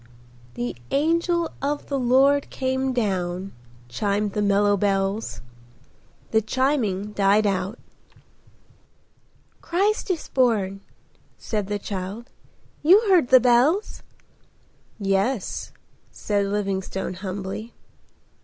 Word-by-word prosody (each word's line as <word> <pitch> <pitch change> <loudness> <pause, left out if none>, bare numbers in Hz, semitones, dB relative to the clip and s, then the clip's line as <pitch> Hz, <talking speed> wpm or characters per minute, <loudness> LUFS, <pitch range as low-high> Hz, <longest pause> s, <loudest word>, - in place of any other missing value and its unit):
"The 120 0 -3
angel 335 +3 +1
of 290 +2 -2
the 280 -1 -2
Lord 270 +3 +3
came 260 0 -1
down,"—chimed 185 - -3
the 210 - -1
mellow 205 0 +3
bells. 195 +1 -1 0.9
The 220 - +3
chiming 220 -5 0
died 205 +1 +3
out. 195 +2 -1 1.8
"Christ 400 +5 0
is 350 -4 -2
born," 205 -7 +1 0.6
said 210 -3 -3
the 205 0 -2
child. 200 +4 -6 0.5
"You 360 +7 +7
heard 355 -9 +5
the 260 0 +7
bells?" 255 - +2 1.0
"Yes," 195 +3 -1 0.4
said 205 -1 -1
Livingstone 195 -2 -2
humbly. 190 +4 -6
210 Hz, 90 wpm, -24 LUFS, 195-260 Hz, 1.8 s, You